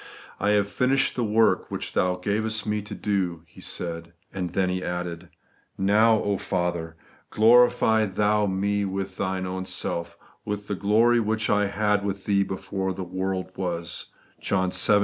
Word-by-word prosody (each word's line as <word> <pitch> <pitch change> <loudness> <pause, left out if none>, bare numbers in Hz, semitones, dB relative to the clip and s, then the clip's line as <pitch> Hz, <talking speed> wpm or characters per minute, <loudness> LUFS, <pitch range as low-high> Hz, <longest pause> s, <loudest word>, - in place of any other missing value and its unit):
' - - -19
I 105 - +1
have 100 -1 +2
finished 130 +5 +1
the 125 - 0
work 110 +1 +2
which - - -4
Thou 90 0 +2
gavest 105 +4 -1
me 105 -1 -1
to 105 0 -8
do,' 90 -4 -1
He 80 - -16
said; 85 0 -5 0.2
and 90 -2 -3
then 95 +2 0
He 90 0 -2
added, 90 -1 -4 0.3
' - - -38
Now, 105 +1 +3
Father, 85 -4 -2 0.3
glorify 110 -1 +5
Thou 105 +2 +1
me 100 +2 0
with 95 -1 -4
Thine 95 -1 -2
own 95 0 -4
self, 85 0 -3 0.3
with 105 0 -4
the - - -2
glory 110 +5 +3
which 110 0 0
I 105 0 +3
had 105 0 +1
with 100 -1 -4
Thee 100 -1 +2
before 95 0 -3
the 95 +1 -5
world 95 +1 -3
was 85 -2 -3 0.2
' - - -34
(John 95 -2 0
wii. 105 +3 +4
100 Hz, 170 wpm, -25 LUFS, 90-105 Hz, 0.3 s, glorify